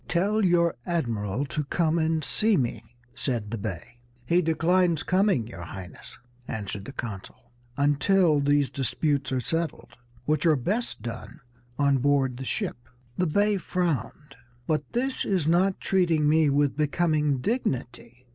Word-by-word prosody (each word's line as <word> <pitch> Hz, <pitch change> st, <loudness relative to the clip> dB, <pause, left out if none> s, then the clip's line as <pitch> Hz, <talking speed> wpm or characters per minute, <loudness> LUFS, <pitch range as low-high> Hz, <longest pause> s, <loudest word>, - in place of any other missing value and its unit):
"Tell 205 Hz, +5 st, +1 dB
your 170 Hz, -2 st, +3 dB
admiral 120 Hz, -, -2 dB
to 150 Hz, +2 st, -3 dB
come 165 Hz, +2 st, +1 dB
and 160 Hz, -1 st, 0 dB
see 215 Hz, +7 st, +2 dB
me," 120 Hz, -4 st, -2 dB, 0.3 s
said 115 Hz, -3 st, -2 dB
the 115 Hz, -, -2 dB
Bey. 100 Hz, +3 st, -6 dB, 0.3 s
"He 170 Hz, +7 st, +3 dB
declines 170 Hz, +1 st, +2 dB
coming, 185 Hz, -, +2 dB
your 110 Hz, -6 st, -9 dB
Highness," 90 Hz, +2 st, -10 dB, 0.3 s
answered 100 Hz, -2 st, -5 dB
the -, -, -7 dB
consul, 115 Hz, -1 st, -8 dB, 0.3 s
"until 150 Hz, +3 st, +3 dB
these 145 Hz, -1 st, +2 dB
disputes 140 Hz, +1 st, -1 dB
are 130 Hz, -, +1 dB
settled, 165 Hz, +6 st, -3 dB, 0.3 s
which 150 Hz, 0 st, +1 dB
are 155 Hz, -, +5 dB
best 205 Hz, -, -2 dB
done 115 Hz, 0 st, -7 dB, 0.4 s
on 140 Hz, -2 st, +3 dB
board 135 Hz, -2 st, +1 dB
the 130 Hz, -, -6 dB
ship." 170 Hz, -, -3 dB, 0.3 s
The 180 Hz, -, 0 dB
Bey 205 Hz, +5 st, +2 dB
frowned. 155 Hz, -, -3 dB, 0.3 s
"But 155 Hz, +2 st, -1 dB
this 260 Hz, +2 st, -1 dB
is 180 Hz, -6 st, 0 dB
not 185 Hz, +3 st, +2 dB
treating 170 Hz, -5 st, +2 dB
me 155 Hz, 0 st, +4 dB
with 140 Hz, 0 st, +2 dB
becoming 150 Hz, -1 st, +1 dB
dignity. 125 Hz, -, -3 dB
150 Hz, 145 wpm, -26 LUFS, 125-175 Hz, 0.4 s, are